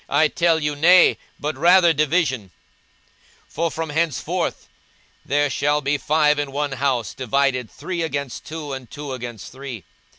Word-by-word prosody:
I 150 +2 +3
tell 170 -2 +2
you, 150 -1 -1
Nay; 175 +5 +5 0.2
but 150 0 -3
rather 170 +3 +5
division: 150 - 0 1.0
42:012:052 - - -32
For 165 +2 -1
from 160 0 -4
henceforth 160 -2 -2 0.6
there 145 +2 +1
shall 145 +2 +1
be 145 +1 0
five 150 0 +2
in 145 -1 -3
one 145 +1 -2
house 130 -3 -1
divided, 130 -1 0
three 180 -2 -5
against 140 -5 -3
two, 155 -3 -6
and 130 -3 -7
two 145 -2 -7
against 120 -4 -7
three. 130 -6 -8
145 Hz, 155 wpm, -22 LUFS, 135-160 Hz, 1.0 s, Nay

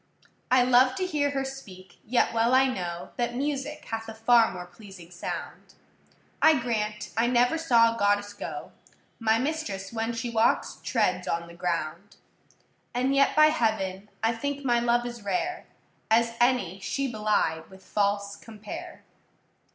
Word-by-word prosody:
I 255 -1 +5
love 255 +1 +4
to 370 - -1
hear 300 -5 0
her 270 -1 -2
speak, 195 -9 -10
yet 245 0 +1
well 230 +2 +3
I 265 +1 +6
know 175 -8 -4
That 240 0 -1
music 290 +2 -3
hath 225 0 -5
a 220 - -8
far 230 0 +4
more 180 -1 -7
pleasing 180 -1 -14
sound: 180 - -7 0.7
I 315 - +6
grant 215 -3 -3
I 230 +2 +2
never 245 +3 +3
saw 235 -7 +4
a - - -8
goddess 205 0 +1
go; 205 - -7 0.5
My 220 -1 +3
mistress, 250 -8 -3
when 225 +1 -2
she 235 +1 -4
walks, 225 0 +1
treads 185 -7 0
on 170 0 -1
the 170 - -12
ground: 170 +2 -3 0.8
And 255 +2 +1
yet 275 0 +3
by 305 0 +7
heaven, 210 -8 -1
I 225 +1 +3
think 285 +4 -4
my 240 -2 +3
love 240 0 +1
as 240 -1 -6
rare, 275 - -2 0.4
As 230 +1 +3
any 240 -7 +2
she 275 +8 -2
belied 210 -8 0
with 190 0 -16
false 200 0 0
compare. 210 -1 -9
230 Hz, 160 wpm, -27 LUFS, 200-255 Hz, 0.8 s, by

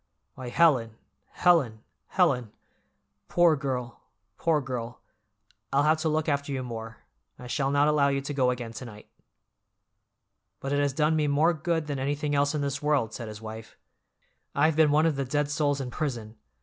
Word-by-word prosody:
Why, 130 -2 -7
Helen, 125 -8 +3 0.3
Helen, 135 -12 +2 0.2
Helen! 130 - +1 0.8
Poor 175 -2 +4
girl, 130 -4 -4 0.3
poor 160 +3 +1
girl, 125 -3 -5 0.7
I'll 140 +1 +3
have 155 +1 +3
to 160 - 0
look 155 0 0
after 140 -1 -1
you 130 -2 -2
more, 115 -2 -7 0.4
I 125 - -11
shall 135 +3 -1
not 145 +1 +3
allow 150 -2 +3
you 140 -1 +1
to 140 +2 -5
go 130 -3 +2
again 120 -2 -4
to 115 +3 -7
night." 105 -3 -12 1.5
"But 135 +1 -3
it 145 - +2
has 145 -1 +1
done 155 +2 +2
me 150 -1 +1
more 150 +4 +3
good 160 0 -1
than 145 -2 -3
anything 145 +2 -1
else 145 +1 +2
in 150 - -1
this 140 0 -2
world," 145 -7 +1
said 115 -1 -6
his 105 0 -9
wife. 110 0 -9 0.8
"I've 155 +2 +3
been 160 -1 +5
one 150 +2 +3
of 160 -4 +1
the 140 - 0
dead 145 +2 -1
souls 145 -1 +1
in 130 -2 -5
prison. 115 -8 -4
140 Hz, 180 wpm, -27 LUFS, 125-150 Hz, 1.5 s, been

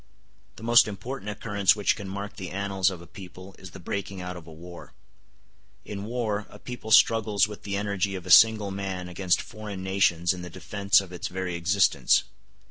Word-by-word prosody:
The - - -12
most 120 0 +6
important 110 +2 -6
occurrence 100 -2 +1
which 105 -2 +1
can 100 -3 -8
mark 100 +1 -6
the 95 -3 -6
annals 95 -1 0
of 90 -3 -8
a - - -13
people 95 +2 -12
is 95 - -10
the 90 - -12
breaking 100 +2 -5
out 90 0 -6
of 85 -2 -11
a - - -11
war. 85 +2 -12 0.9
In 100 -1 -6
war 110 -3 -2
a - - -13
people 120 0 -8
struggles 105 -3 +4
with 105 -1 -10
the 100 -1 -3
energy 100 -1 -1
of 90 -1 -7
a 90 - -3
single 110 0 +6
man 95 -2 -4
against 90 0 0
foreign 105 -4 -8
nations 95 -2 +2
in 90 - -8
the 90 - -7
defence 100 +1 +1
of 95 -2 -11
its 90 - -4
very 90 0 -4
existence. 90 +3 +2
100 Hz, 195 wpm, -26 LUFS, 90-105 Hz, 0.9 s, most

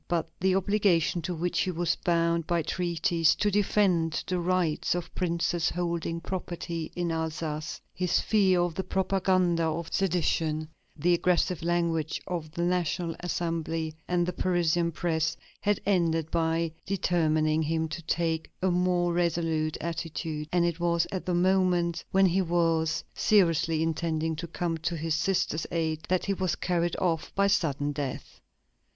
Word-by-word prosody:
But 170 -2 0
the 190 0 +2
obligation, 190 -4 +2
to 180 +2 -3
which 170 +1 -1
he 190 - +1
was 175 -1 0
bound 170 -1 +1
by 170 -2 +1
treaties, 170 -1 +1
to 210 - +1
defend 185 -5 +2
the 185 -1 -1
rights 175 -2 +1
of 175 -1 -5
princes 170 -1 0
holding 170 -1 -2
property 170 -2 -4
in 175 -1 -1
Alsace, 160 -1 -3
his 180 -1 +1
fear 190 -5 +3
of 175 -1 0
the 190 - -3
propaganda 185 -2 +1
of 160 +1 -3
sedition, 160 -4 0 0.3
the 175 +4 +3
aggressive 180 0 +1
language 165 -2 0
of 170 -4 -4
the 170 - -2
National 175 -1 0
Assembly 165 -2 -2
and 175 -1 +1
the 180 - -2
Parisian 175 -2 +1
press, 160 -1 -1 0.2
had 205 -1 +1
ended 165 -5 +1
by 165 0 +1 0.2
determining 160 -5 +1
him 160 +1 0
to 170 - -5
take 165 0 -1
a 185 0 +1
more 175 -1 +1
resolute 165 -2 0
attitude, 160 -2 -4
and 175 -1 +3
it 170 0 -1
was 170 -1 +2
at 185 -1 -4
the 180 - +1
moment 175 -2 +2
when 195 0 +4
he 185 +1 +3
was 165 -2 +1
seriously 165 -5 +3
intending 160 0 -1
to 170 +2 -5
come 170 0 -2
to 170 +2 -2
his 160 0 -1
sister's 165 -1 0
aid 160 -2 -1
that 185 0 +1
he 200 - +1
was 185 -2 -1
carried 175 -1 0
off 165 -4 -1
by 200 - +3
sudden 145 -7 +1
death. 145 -2 -5
170 Hz, 155 wpm, -28 LUFS, 160-180 Hz, 0.3 s, when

